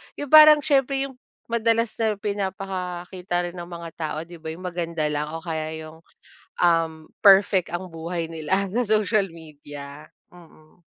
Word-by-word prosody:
yung 290 Hz, -1 st, -6 dB
parang 305 Hz, -1 st, +9 dB
siyempre 275 Hz, -2 st, +2 dB
yung 265 Hz, -2 st, -8 dB, 0.3 s
madalas 230 Hz, 0 st, +1 dB
na 220 Hz, -2 st, +1 dB
pinapakita 190 Hz, -3 st, -3 dB
rin -, -, -16 dB
ng 175 Hz, +1 st, -8 dB
mga 170 Hz, -1 st, -7 dB
tao, 155 Hz, -1 st, -3 dB
'di 175 Hz, -, -11 dB
ba, 160 Hz, -, -9 dB
yung 175 Hz, +3 st, -10 dB
maganda 170 Hz, -2 st, -3 dB
lang 150 Hz, 0 st, -2 dB
o 165 Hz, -, -5 dB
kaya 160 Hz, -2 st, -4 dB
yung, 155 Hz, +1 st, -12 dB, 0.6 s
um, 165 Hz, -2 st, +1 dB, 0.2 s
perfect 195 Hz, -2 st, +6 dB
ang 180 Hz, +2 st, -4 dB
buhay 165 Hz, +1 st, -4 dB
nila 190 Hz, +5 st, -1 dB
sa 245 Hz, +3 st, +1 dB
social 215 Hz, -1 st, +2 dB
media. 145 Hz, -2 st, -11 dB, 0.3 s
Mm. 160 Hz, -1 st, -19 dB
175 Hz, 155 wpm, -24 LUFS, 160-210 Hz, 0.6 s, parang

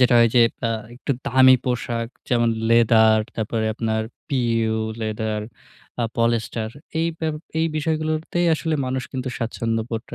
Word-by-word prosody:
যেটা 125 Hz, -1 st, +5 dB
হয় 115 Hz, 0 st, +6 dB
যে 120 Hz, -, +8 dB, 0.3 s
আ -, -, -1 dB, 0.2 s
একটু 135 Hz, +3 st, -2 dB
দামি 130 Hz, +1 st, +6 dB
পোশাক 120 Hz, -2 st, -2 dB, 0.2 s
যেমন, 120 Hz, -1 st, +2 dB, 0.2 s
leather, 110 Hz, -1 st, +5 dB, 0.2 s
তারপরে 110 Hz, 0 st, -1 dB
আপনার 110 Hz, -1 st, -1 dB, 0.3 s
PU 115 Hz, -4 st, +1 dB, 0.2 s
leather, 110 Hz, 0 st, -2 dB, 0.6 s
আ -, -, +2 dB
polyester 115 Hz, -1 st, 0 dB, 0.3 s
এই 165 Hz, -, +2 dB
বেপ 160 Hz, -1 st, -1 dB, 0.2 s
এই 160 Hz, -, +2 dB
বিষয়গুলোতেই 155 Hz, +2 st, -1 dB
আসলে 160 Hz, 0 st, -1 dB
মানুষ 130 Hz, 0 st, -2 dB
কিন্তু 130 Hz, 0 st, -3 dB
স্বাচ্ছন্দ্যবোধটা 115 Hz, 0 st, -3 dB
115 Hz, 135 wpm, -22 LUFS, 110-130 Hz, 0.6 s, যে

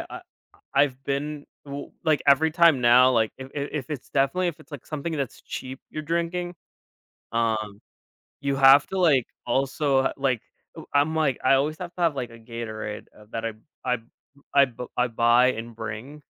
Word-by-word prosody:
uh -, -, -7 dB, 0.5 s
I 140 Hz, -, +6 dB
I've 135 Hz, -2 st, -2 dB
been 145 Hz, +1 st, -3 dB, 0.2 s
w 140 Hz, 0 st, -7 dB
like, 155 Hz, -2 st, +3 dB
every 145 Hz, +3 st, +5 dB
time 165 Hz, -5 st, +5 dB
now, 125 Hz, +2 st, +6 dB
like, 110 Hz, -2 st, +2 dB
if 130 Hz, 0 st, -8 dB
if 145 Hz, 0 st, -3 dB
if 145 Hz, -2 st, -4 dB
it's 140 Hz, -4 st, -5 dB
definitely, 140 Hz, +7 st, +1 dB
if 170 Hz, -1 st, -5 dB
it's, 155 Hz, -1 st, -18 dB
like, 140 Hz, -, -8 dB
something 155 Hz, +2 st, -4 dB
that's 140 Hz, -4 st, -4 dB
cheap 130 Hz, +1 st, -7 dB
you're 155 Hz, -, -5 dB
drinking, 170 Hz, +2 st, -2 dB, 0.8 s
um, 110 Hz, -3 st, -1 dB, 0.6 s
you 140 Hz, -1 st, 0 dB
have 135 Hz, +1 st, +7 dB
to, 190 Hz, -, -3 dB
like, 145 Hz, -9 st, +4 dB, 0.2 s
also, 135 Hz, +1 st, +1 dB
like, 130 Hz, -4 st, 0 dB, 0.4 s
ooh -, -, -9 dB
I'm, 145 Hz, +3 st, +3 dB
like, 150 Hz, -5 st, +1 dB
I 135 Hz, -, +5 dB
always 150 Hz, +3 st, +1 dB
have 175 Hz, -1 st, -6 dB
to 180 Hz, -, -5 dB
have, 165 Hz, -4 st, +2 dB
like, 125 Hz, -3 st, -4 dB
a 115 Hz, -, -13 dB
Gatorade, 110 Hz, -2 st, -6 dB
uh, 105 Hz, -, -16 dB
that 115 Hz, 0 st, -3 dB
I 115 Hz, -, -2 dB, 0.3 s
I 125 Hz, -1 st, +1 dB, 0.6 s
I 140 Hz, -1 st, +7 dB
b 125 Hz, -1 st, -8 dB
I 125 Hz, 0 st, +3 dB
buy 120 Hz, +2 st, +4 dB
and 115 Hz, +1 st, -7 dB
bring 115 Hz, +7 st, -7 dB
135 Hz, 185 wpm, -25 LUFS, 120-150 Hz, 0.8 s, have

